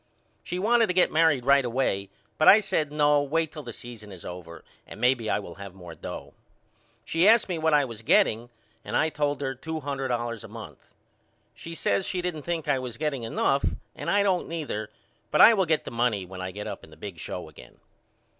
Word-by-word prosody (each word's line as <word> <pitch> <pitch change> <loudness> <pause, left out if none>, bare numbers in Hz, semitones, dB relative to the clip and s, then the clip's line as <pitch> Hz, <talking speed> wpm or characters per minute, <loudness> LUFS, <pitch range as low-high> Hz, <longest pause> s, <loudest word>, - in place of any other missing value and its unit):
She 180 - -5
wanted 225 +4 +3
to 180 - -2
get 180 - +4
married 155 -6 +3
right 140 0 +5
away 115 -6 -1 0.3
but 155 - +4
I 210 - +10
said 160 -8 -1
No 150 -1 +3
wait 160 +2 0
till 155 - -7
the 120 -4 -7
season 110 -3 -10
is 90 -3 -11
over 85 -2 -9 0.2
and - - -10
maybe 125 -2 +2
I - - +2
will 100 -4 -7
have 100 -2 -9
more 90 -3 -10
dough. - - -8 0.7
She 165 +4 +2
asked 225 +1 +6
me 175 -3 -2
what 160 -1 +3
I 145 -1 +4
was 115 -3 -8
getting 115 +1 +3 0.3
and - - -1
I 160 - +2
told 145 -2 -1
her 135 -1 -1
two 160 +5 -5
hundred 135 -2 -3
dollars 120 -2 -2
a - - -8
month. - - -11 0.7
She 165 0 -9
says 100 -10 0
she 180 -1 -2
didn't 175 -4 -3
think 170 0 -3
I 135 - +2
was 125 -2 -6
getting 150 -4 -2
enough 135 +4 0 0.3
and - - -5
I 205 0 +3
don't 190 -3 +1
neither 145 -11 -4 0.4
but - - +1
I 230 - +10
will 190 -5 +1
get 155 -1 +1
the - - -6
money 115 -5 0
when 95 0 -9
I 95 - -3
get 105 +3 -7
up - - -6
in - - -14
the 80 - -16
big 90 -1 -8
show - - -6
again. - - -15
135 Hz, 220 wpm, -26 LUFS, 110-160 Hz, 0.7 s, I